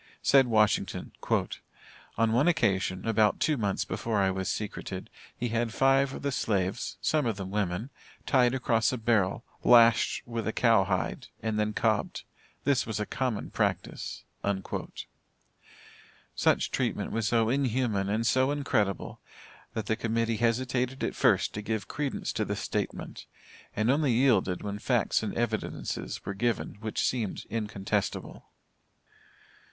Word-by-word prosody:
Said 135 Hz, -1 st, +5 dB
Washington, 110 Hz, -3 st, +1 dB, 1.1 s
"On 115 Hz, 0 st, +2 dB
one 125 Hz, +8 st, +3 dB
occasion, 95 Hz, -, +1 dB
about 110 Hz, -2 st, +3 dB
two 155 Hz, -, +2 dB
months 100 Hz, -6 st, -1 dB
before 115 Hz, -2 st, -2 dB
I 95 Hz, -1 st, +3 dB
was 95 Hz, -1 st, -2 dB
secreted, 105 Hz, -1 st, -5 dB, 0.3 s
he 120 Hz, -, -2 dB
had 115 Hz, 0 st, 0 dB
five 135 Hz, 0 st, +4 dB
of -, -, -8 dB
the 140 Hz, -, 0 dB
slaves 100 Hz, -6 st, -1 dB
(some 150 Hz, -5 st, +1 dB
of 110 Hz, -3 st, -1 dB
them 95 Hz, -1 st, -5 dB
women) 105 Hz, +4 st, -2 dB, 0.3 s
tied 125 Hz, -2 st, +3 dB
across 115 Hz, -3 st, +2 dB
a 130 Hz, -, -2 dB
barrel, 110 Hz, -2 st, +1 dB, 0.2 s
lashed 115 Hz, -1 st, +5 dB
with 115 Hz, -2 st, -4 dB
the 110 Hz, -, -1 dB
cow 115 Hz, -5 st, +4 dB
hide 95 Hz, -4 st, -2 dB, 0.2 s
and 110 Hz, -1 st, -1 dB
then 105 Hz, 0 st, 0 dB
cobbed 110 Hz, -1 st, 0 dB, 0.4 s
this 140 Hz, -5 st, +2 dB
was 110 Hz, -2 st, -3 dB
a 105 Hz, -, -1 dB
common 125 Hz, -3 st, -2 dB
practice." -, -, -2 dB, 2.1 s
Such -, -, +2 dB
treatment -, -, -1 dB
was 115 Hz, -1 st, 0 dB
so 115 Hz, 0 st, +2 dB
inhuman 120 Hz, -6 st, 0 dB
and 110 Hz, +3 st, 0 dB
so 130 Hz, +2 st, +3 dB
incredible, 125 Hz, -, -1 dB, 0.6 s
that 110 Hz, -2 st, -2 dB
the 110 Hz, -, +1 dB
Committee 115 Hz, 0 st, 0 dB
hesitated 125 Hz, +2 st, 0 dB
at -, -, -1 dB
first -, -, +2 dB
to 105 Hz, -, -4 dB
give 110 Hz, -2 st, -3 dB
credence 145 Hz, -2 st, -3 dB
to -, -, 0 dB
the -, -, -2 dB
statement, -, -, -4 dB, 0.5 s
and 110 Hz, +4 st, +2 dB
only 140 Hz, -2 st, +2 dB
yielded 110 Hz, -8 st, +2 dB
when 105 Hz, 0 st, -4 dB
facts 120 Hz, -1 st, +1 dB
and 110 Hz, -, -4 dB
evidences 115 Hz, -2 st, -3 dB
were 100 Hz, -, -3 dB
given 115 Hz, +1 st, -1 dB
which 110 Hz, 0 st, -1 dB
seemed 115 Hz, -6 st, -2 dB
incontestible. 105 Hz, -2 st, -3 dB
115 Hz, 145 wpm, -29 LUFS, 105-125 Hz, 2.1 s, Said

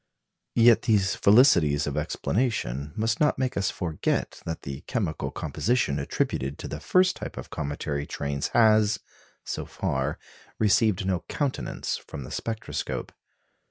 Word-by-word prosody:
Yet 115 Hz, -1 st, +6 dB
these 100 Hz, -4 st, +2 dB
felicities 85 Hz, -, +5 dB
of 75 Hz, -, -3 dB
explanation 75 Hz, -, -1 dB
must 110 Hz, 0 st, 0 dB
not 150 Hz, -, +3 dB
make 130 Hz, -1 st, -1 dB
us 100 Hz, -, +1 dB
forget 80 Hz, -4 st, -2 dB
that 80 Hz, -, -4 dB
the 70 Hz, +1 st, -6 dB
chemical 100 Hz, -, -2 dB
composition 115 Hz, -, 0 dB
attributed 70 Hz, -1 st, -2 dB
to -, -, -6 dB
the 75 Hz, -, -5 dB
first 185 Hz, -, +3 dB
type -, -, -7 dB
of -, -, -8 dB
cometary 70 Hz, 0 st, -3 dB
trains 70 Hz, -1 st, -2 dB
has, 110 Hz, -2 st, +4 dB, 0.5 s
so -, -, -4 dB
far, -, -, -2 dB, 0.4 s
received 105 Hz, -2 st, +3 dB
no 95 Hz, -2 st, +1 dB
countenance 145 Hz, -3 st, -2 dB
from 70 Hz, -, -8 dB
the 65 Hz, -, -9 dB
spectroscope. 110 Hz, -1 st, -4 dB
100 Hz, 135 wpm, -26 LUFS, 75-115 Hz, 0.5 s, Yet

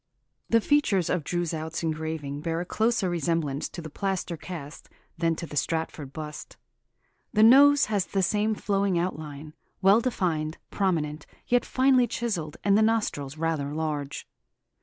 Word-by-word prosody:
"The 230 Hz, 0 st, +4 dB
features 215 Hz, -, +2 dB
of 180 Hz, -4 st, 0 dB
Droeshout's 165 Hz, -1 st, -3 dB
engraving 155 Hz, -3 st, -3 dB
bear 165 Hz, +1 st, -2 dB
a 175 Hz, -, -3 dB
closer 220 Hz, +1 st, +1 dB
resemblance 165 Hz, -4 st, -1 dB
to 170 Hz, -, -8 dB
the 155 Hz, -, -7 dB
plaster 190 Hz, -1 st, -2 dB
cast 160 Hz, -3 st, -9 dB, 0.3 s
than 165 Hz, -1 st, +2 dB
to 170 Hz, -, -5 dB
the 150 Hz, -, -9 dB
Stratford 160 Hz, -2 st, -2 dB
bust. 150 Hz, 0 st, -8 dB, 0.8 s
The 215 Hz, -, +5 dB
nose 285 Hz, +5 st, +7 dB
has 205 Hz, -3 st, -1 dB
the 195 Hz, -1 st, 0 dB
same 210 Hz, +3 st, +1 dB
flowing 200 Hz, -3 st, 0 dB
outline, 155 Hz, -4 st, -4 dB, 0.3 s
well 200 Hz, +4 st, +5 dB
defined, 165 Hz, -10 st, -1 dB
prominent, 160 Hz, -6 st, -1 dB, 0.2 s
yet 245 Hz, -1 st, +2 dB
finely 255 Hz, -2 st, +3 dB
chiselled, 180 Hz, -13 st, -3 dB
and 200 Hz, -1 st, +4 dB
the 215 Hz, -, +4 dB
nostrils 210 Hz, -11 st, 0 dB
rather 155 Hz, -3 st, -1 dB
large. 150 Hz, -3 st, -3 dB
170 Hz, 145 wpm, -27 LUFS, 155-205 Hz, 0.8 s, nose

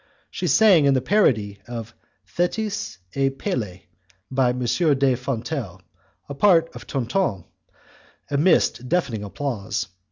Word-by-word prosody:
She -, -, -3 dB
sang 195 Hz, -9 st, +5 dB
in 140 Hz, -1 st, +4 dB
the -, -, +3 dB
parody 120 Hz, -, +1 dB
of 115 Hz, -2 st, -7 dB, 0.3 s
'Thetis 200 Hz, -, -2 dB, 0.2 s
et 135 Hz, 0 st, 0 dB
Pelee', 95 Hz, -9 st, -3 dB, 0.5 s
by 130 Hz, -1 st, +2 dB
M. 125 Hz, -, -2 dB
de 140 Hz, -2 st, +2 dB
Fontelle, 125 Hz, -, -4 dB, 0.5 s
the 140 Hz, -, -6 dB
part 165 Hz, +1 st, +3 dB
of -, -, -10 dB
Tonton, 125 Hz, -, -1 dB, 0.9 s
amidst 140 Hz, -4 st, +2 dB
deafening 135 Hz, -12 st, 0 dB
applause. 105 Hz, -2 st, -3 dB
135 Hz, 120 wpm, -23 LUFS, 115-165 Hz, 0.9 s, sang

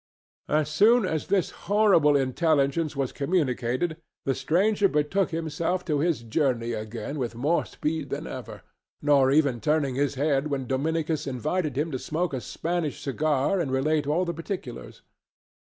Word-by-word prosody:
As 150 Hz, -1 st, +2 dB
soon 215 Hz, +8 st, +4 dB
as 160 Hz, -4 st, -2 dB
this 195 Hz, -4 st, +1 dB, 0.2 s
horrible 200 Hz, -8 st, +5 dB
intelligence 145 Hz, +2 st, +1 dB
was 135 Hz, -2 st, -1 dB
communicated 145 Hz, -1 st, -1 dB, 0.3 s
the 135 Hz, -, +2 dB
stranger 200 Hz, +8 st, +2 dB
betook 150 Hz, +5 st, +1 dB
himself 165 Hz, +2 st, -2 dB
to 150 Hz, -5 st, 0 dB
his 160 Hz, -5 st, 0 dB
journey 120 Hz, -1 st, 0 dB
again 110 Hz, +6 st, -5 dB
with 120 Hz, -3 st, -3 dB
more 145 Hz, +8 st, +1 dB
speed 150 Hz, -2 st, -3 dB
than -, -, -4 dB
ever, -, -, -8 dB, 0.4 s
not 140 Hz, -3 st, +4 dB
even 140 Hz, -5 st, +2 dB
turning 150 Hz, 0 st, +1 dB
his 140 Hz, +2 st, 0 dB
head 140 Hz, +1 st, +1 dB
when 140 Hz, -3 st, -2 dB
Dominicus 155 Hz, +4 st, -1 dB
invited 150 Hz, +3 st, -2 dB
him 155 Hz, +3 st, 0 dB
to 130 Hz, -, -3 dB
smoke 165 Hz, +3 st, -2 dB
a 130 Hz, -, -2 dB
Spanish 170 Hz, 0 st, -3 dB
cigar 150 Hz, +5 st, 0 dB
and 150 Hz, -6 st, -1 dB
relate 145 Hz, +3 st, +1 dB
all 165 Hz, +5 st, +1 dB
the 170 Hz, -, -2 dB
particulars. 165 Hz, -, -7 dB
150 Hz, 150 wpm, -26 LUFS, 135-165 Hz, 0.4 s, horrible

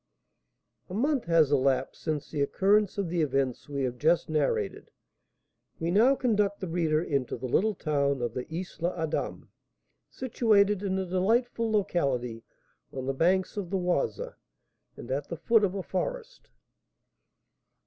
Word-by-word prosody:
A 180 Hz, -, -5 dB
month 275 Hz, +3 st, +1 dB
has 165 Hz, -4 st, +4 dB
elapsed 135 Hz, -2 st, +1 dB
since 155 Hz, -3 st, -3 dB
the 150 Hz, -, -2 dB
occurrence 200 Hz, +8 st, +2 dB
of 200 Hz, -3 st, -1 dB
the 170 Hz, 0 st, 0 dB
events 135 Hz, -3 st, -1 dB
we 140 Hz, -1 st, -2 dB
have 125 Hz, -1 st, -3 dB
just 165 Hz, +2 st, +2 dB
narrated. 150 Hz, -2 st, -1 dB, 0.9 s
We 165 Hz, +1 st, -1 dB
now 235 Hz, +8 st, +5 dB
conduct 210 Hz, -6 st, +1 dB
the 190 Hz, -, -4 dB
reader 165 Hz, -2 st, +1 dB
into 140 Hz, -7 st, -1 dB
the 125 Hz, -, -6 dB
little 205 Hz, -, +1 dB
town 140 Hz, -4 st, 0 dB
of 120 Hz, -, -2 dB
the 125 Hz, -, -5 dB, 0.3 s
Isle 175 Hz, +2 st, 0 dB
Adam, 160 Hz, -1 st, -3 dB, 0.6 s
situated 210 Hz, -5 st, +2 dB
in 190 Hz, -2 st, -1 dB
a 190 Hz, -, -1 dB
delightful 225 Hz, +5 st, +1 dB
locality 135 Hz, -, 0 dB, 0.5 s
on 130 Hz, -1 st, -5 dB
the 135 Hz, -, -1 dB
banks 185 Hz, +7 st, +1 dB
of 195 Hz, -4 st, -3 dB
the 195 Hz, -, 0 dB
Oise, 175 Hz, -, 0 dB, 0.8 s
and 120 Hz, -, -8 dB
at 140 Hz, +2 st, -2 dB
the 170 Hz, -, -4 dB
foot 220 Hz, +7 st, +3 dB
of 195 Hz, -1 st, +1 dB
a 195 Hz, -, -3 dB
forest. -, -, -4 dB
175 Hz, 150 wpm, -28 LUFS, 140-205 Hz, 0.9 s, now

